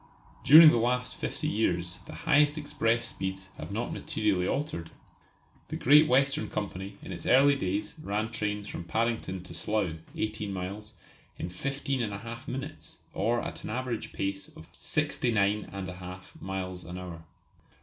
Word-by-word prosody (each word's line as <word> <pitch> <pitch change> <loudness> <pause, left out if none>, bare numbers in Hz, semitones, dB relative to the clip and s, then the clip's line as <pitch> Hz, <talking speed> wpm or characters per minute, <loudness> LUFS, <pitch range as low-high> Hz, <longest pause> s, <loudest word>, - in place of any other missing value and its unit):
During 155 +2 +11
the - - +2
last 125 +2 0
fifty - - -3
years 90 -4 0
the - - -8
highest 150 -1 +5
express 115 -6 +1
speeds 95 -4 -4
have - - -6
not - - -2
materially 100 -4 +1
altered. 135 - -2 0.8
The - - -4
Great 150 +4 +6
Western 135 +4 +2
Company 100 -1 -4
in - - -7
its 85 - -7
early 140 +2 +6
days 100 -4 -2
ran 105 -1 -1
trains 105 -2 -2
from 85 - -5
Paddington 110 -2 -1
to 90 - -10
Slough, 95 -1 -1 0.2
18 110 -1 -2
miles, 100 +3 -5 0.4
in 85 - -4
15 135 +7 -2
1/2 115 +2 -4
minutes, 135 +4 -6 0.2
or 120 +1 +1
at - - -6
an - - -5
average 120 0 -3
pace 95 0 -3
of 80 - -13
69 105 -3 +1
1/2 90 -1 -8
miles 95 -1 -4
an 90 +2 -7
hour. 85 -3 -7
105 Hz, 150 wpm, -29 LUFS, 95-125 Hz, 0.8 s, During